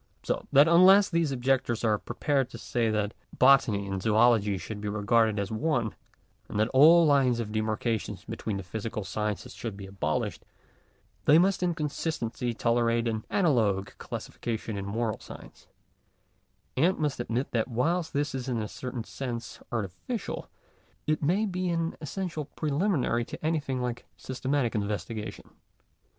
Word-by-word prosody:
So - - -2
that 145 +3 +7
unless 190 +4 +7
such 165 -2 +2
objectors 125 -3 0
are 105 -2 +2
prepared 135 +1 -1
to - - -9
say 115 -2 -1
that 105 -1 0 0.2
Botany 125 -7 +5
and 95 -1 -3
Zoology 110 -1 +3
should 105 +2 -7
be 105 - -4
regarded 110 +1 +2
as 100 0 -2
one, 120 -2 0 0.6
and 105 - -2
that 110 +2 +2
all 160 +5 +7
lines 135 -5 +3
of 110 -2 -3
demarcation 110 +1 -1
between 105 -3 -3
the 95 - -5
physical 105 +3 -4
sciences 105 -1 -3
should 110 -4 -6
be 100 - -8
abolished, 95 -6 -2 0.8
they 150 - +7
must 185 +2 +3
in 175 -2 +1
consistency 145 -6 -2
tolerate 115 0 +1
an 110 -1 -2
analogous 110 - +2
classification 110 -2 -5
in 100 0 -4
moral 110 +1 -2
science; - - -12 1.1
and 170 +8 +3
must 150 -4 -1
admit 120 +2 -2
that 115 -2 0
whilst 160 +8 0
this 145 0 -1
is 130 -1 -4
in 125 - 0
a 105 - -3
certain 125 +1 -5
sense 120 -2 -6
artificial, 115 - -4 0.6
it 155 0 0
may 180 +9 +2
be 185 -2 -2
an 165 -1 -1
essential 160 -1 -4
preliminary 145 - 0
to 135 - -8
anything 150 -5 0
like 120 0 -4
systematic 130 -1 -1
investigation. 105 +1 -4
120 Hz, 150 wpm, -28 LUFS, 110-150 Hz, 1.1 s, that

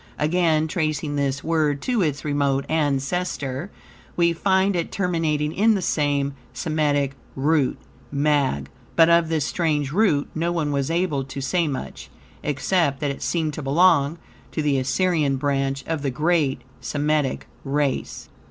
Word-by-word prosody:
Again, 160 0 +2
tracing 155 -2 -1
this 140 -1 -1
word 155 -3 +1
to 245 -4 +1
its 150 -4 -1
remote 140 -2 +1
ancestor, 145 0 -1 0.5
we 170 -1 +3
find 190 +2 +2
it 170 -2 -2
terminating 160 -5 0
in 220 +2 +4
the 195 - -1
same 145 -3 0 0.2
Semitic 145 -3 0 0.2
root, 145 0 +1 0.3
"mag," 140 - +1 0.2
but 165 0 +6
of 170 -1 +4
this 155 -3 0
strange 150 -5 0
root 170 -6 +2
no 170 +2 -1
one 160 -4 -1
was 140 0 -1
able 165 -5 0
to 135 +1 -7
say 165 +5 0
much, 135 -3 -6 0.3
except 145 0 0
that 145 -2 -1
it 140 - -8
seemed 160 -3 -1
to 155 - -5
belong 150 +1 +3 0.4
to 155 - -1
the 140 -2 +2
Assyrian 145 +1 +1
branch 135 -1 -1
of 160 -3 -2
the 140 - -1
great 150 -1 +1 0.2
Semitic 145 -2 -1 0.2
race. 140 -1 -2
150 Hz, 145 wpm, -23 LUFS, 140-165 Hz, 0.5 s, but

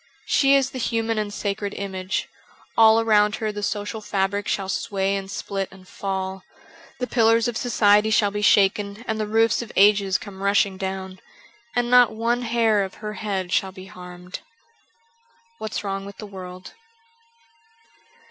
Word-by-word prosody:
She 275 0 +4
is 270 -1 +2
the 260 - -6
human 225 -1 -1
and 210 -1 -3
sacred 200 0 -3
image; 190 -1 -3 0.5
all 225 0 +6
around 210 -2 +3
her 215 -1 -2
the 205 0 -6
social 205 +2 -3
fabric 200 0 -1
shall 195 -1 -1
sway 195 0 -1
and 195 -1 -5
split 195 -1 -4
and 190 -1 -16
fall; 190 -1 -4 0.6
the 250 - -1
pillars 230 -1 +3
of 240 - -3
society 215 -3 +3
shall 210 -2 +3
be 205 +1 -3
shaken 200 +2 +2
and 220 0 -2
the 215 - -1
roofs 225 +2 +2
of 235 - -8
ages 200 -1 +4
come 195 -2 -10
rushing 200 -1 +2
down; 190 -1 -5 0.6
and 245 0 0
not 245 -3 +6
one 235 +2 0
hair 225 -3 +2
of 190 - -7
her 210 0 -6
head 195 -4 -3
shall 190 +1 +1
be 185 0 -11
harmed. 180 -1 -10 1.2
^What's 215 -1 -4
Wrong 195 -1 -3
with 200 0 -10
the 215 - -8
World.' 185 -2 -10
205 Hz, 160 wpm, -23 LUFS, 195-220 Hz, 1.2 s, all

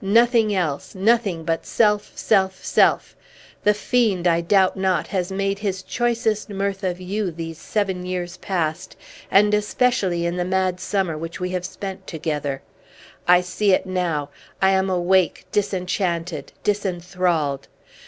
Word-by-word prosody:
"Nothing 230 +2 +4
else; 160 -5 -2
nothing 200 -4 +2
but 165 0 -1
self, 210 -2 +1
self, 190 -2 +1
self! - - +2 0.5
The 210 0 +4
fiend, 210 -5 +1
I 170 0 +3
doubt 190 +2 +3
not, 185 -4 +1
has 185 0 -2
made 195 +1 -1
his 195 -3 -3
choicest 230 -3 -1
mirth 200 0 -2
of 180 -1 -1
you 195 +2 -2
these 165 -1 -7
seven 190 -3 -2
years 180 0 -4
past, 175 -2 -3 0.3
and 210 +2 +4
especially 210 -4 +1
in 170 +1 -1
the 180 - 0
mad 185 0 0
summer 190 -5 -1
which 165 +2 -6
we 180 0 -2
have 180 -1 -2
spent 190 0 -7
together. 150 -4 -3 0.6
I 180 0 +6
see 195 +2 +1
it - - +2
now! 170 -6 -2 0.3
I 190 0 +4
am 190 0 +2
awake, 180 -1 +2
disenchanted, 180 -4 -1
disinthralled! 175 -7 -1
185 Hz, 145 wpm, -22 LUFS, 175-200 Hz, 0.6 s, I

